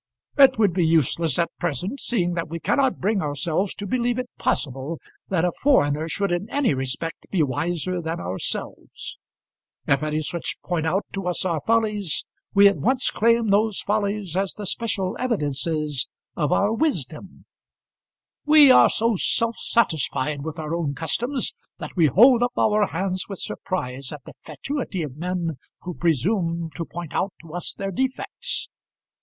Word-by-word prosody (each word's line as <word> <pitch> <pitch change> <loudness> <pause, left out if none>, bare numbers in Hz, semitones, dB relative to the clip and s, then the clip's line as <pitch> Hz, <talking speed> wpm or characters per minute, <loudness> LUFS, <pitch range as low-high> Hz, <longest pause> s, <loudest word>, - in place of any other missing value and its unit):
"It 275 -4 +6
would 205 -5 +3
be 180 0 +2
useless 160 -1 +2
at 170 -1 +1
present, 175 - -2
seeing 180 -9 0
that 165 -2 -3
we 165 +1 -4
cannot 265 - +1
bring 200 +1 +1
ourselves 155 +6 -1
to 205 - -6
believe 240 +3 0
it 250 -1 -4
possible 135 +4 -1 0.3
that 180 -2 +1
a 175 - +1
foreigner 160 - +3
should 200 +2 -1
in 175 +5 -2
any 280 - +1
respect 135 +6 -3
be 180 -5 +2
wiser 175 +6 -1
than 165 +1 -3
ourselves. 95 - -5 0.7
If 135 - +2
any 155 0 -1
such 170 +2 -3
point 165 -3 -1
out 190 +5 0
to 195 -2 -3
us 180 +1 0
our 165 -5 0
follies, 210 -7 +1 0.3
we 200 0 +7
at 200 - +2
once 255 +2 +1
claim 230 0 +2
those 210 0 +2
follies 205 -3 -1
as 195 0 0
the 210 - -6
special 200 -3 -1
evidences 150 - -1 0.3
of 150 -4 0
our 205 +2 +2
wisdom. 190 - -3 1.0
We 300 -2 +8
are - - +7
so 230 0 +1
self 230 +5 +1
satisfied 150 - 0
with 160 +1 -5
our 155 0 -4
own 160 -4 -1
customs, 240 - -1 0.2
that - - -8
we 165 -4 +5
hold 235 - +6
up 245 0 0
our 210 -1 +3
hands 185 +2 -2
with 195 - -5
surprise 135 -10 -4
at 150 - -8
the - - -11
fatuity 190 - -4
of 140 -4 -6
men 170 -2 -2 0.3
who 180 - -5
presume 170 - 0
to 165 +5 -4
point 170 -2 -7
out 195 - -1
to 165 -1 -12
us 175 - -2
their 195 0 -4
defects. 260 +6 -2
180 Hz, 165 wpm, -23 LUFS, 160-215 Hz, 1.0 s, We